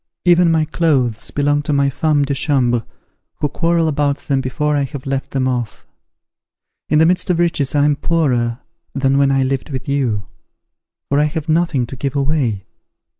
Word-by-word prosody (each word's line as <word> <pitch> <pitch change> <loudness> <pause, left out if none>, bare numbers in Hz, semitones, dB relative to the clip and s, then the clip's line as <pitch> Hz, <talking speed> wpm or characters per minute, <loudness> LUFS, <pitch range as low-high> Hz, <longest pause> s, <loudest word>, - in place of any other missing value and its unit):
Even 175 -1 +5
my 160 -1 +2
clothes 140 -8 0
belong 145 0 +1
to 145 - -3
my 140 -1 +2
femmes 145 +1 +1
de 140 - -2
chambre, 130 -5 +1 0.5
who 150 - -1
quarrel 165 +3 +1
about 145 -2 0
them 135 -1 -1
before 150 +3 -1
I 145 - +1
have 140 -1 -5
left 135 0 -3
them 130 -1 -1
off. 120 -4 -3 1.0
In 150 - +3
the 160 - +5
midst 180 +3 +1
of 180 - +2
riches 165 -5 0
I 145 0 +4
am 145 -1 +3
poorer 130 -7 0 0.3
than 135 0 +2
when 140 -1 +3
I 135 -1 +2
lived 135 +1 -2
with 130 0 -5
you; 125 -8 -1 0.8
for 140 - +1
I 150 - +3
have 155 +1 -4
nothing 160 -5 +1
to 125 - -9
give 135 +2 -3
away. 135 -8 0
140 Hz, 180 wpm, -18 LUFS, 130-155 Hz, 1.0 s, Even